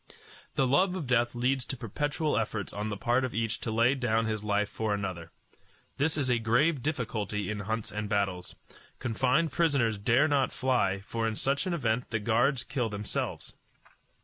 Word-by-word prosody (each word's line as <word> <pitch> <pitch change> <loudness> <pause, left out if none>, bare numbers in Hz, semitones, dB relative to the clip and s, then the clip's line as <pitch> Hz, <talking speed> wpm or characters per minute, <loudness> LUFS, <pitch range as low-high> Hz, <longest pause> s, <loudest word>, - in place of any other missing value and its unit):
The 135 - +3
love 180 +8 +3
of 175 -6 -3
death 120 -1 +2
leads 125 +2 +1
to 135 - -5
perpetual 145 +7 -1
efforts 110 -3 -2
on 105 +1 -3
the 105 - -3
part 120 +5 +1
of 130 - -3
each 115 0 -1
to - - -4
lay 115 +3 +3
down 115 -4 +1
his 110 -1 -2
life 105 0 +1
for 110 -1 -1
another. 95 -5 -4 0.7
This 150 +3 +1
is 140 -3 0
a 125 -2 +2
grave 125 +7 +2
difficulty 110 -8 -2
in 105 - -3
hunts 110 +2 -3
and 105 -1 -4
battles. 95 -4 -1 0.4
Confined 130 +7 +1
prisoners 135 -11 +2
dare 120 +8 +4
not 140 -3 +2
fly, 100 -7 +1
for 115 +3 -2
in 110 - -2
such 140 - 0
an 175 - 0
event 120 -5 -1
the 115 - 0
guards 120 +5 +2
kill 125 -3 -2
themselves. 105 0 -4
115 Hz, 180 wpm, -29 LUFS, 105-135 Hz, 0.7 s, dare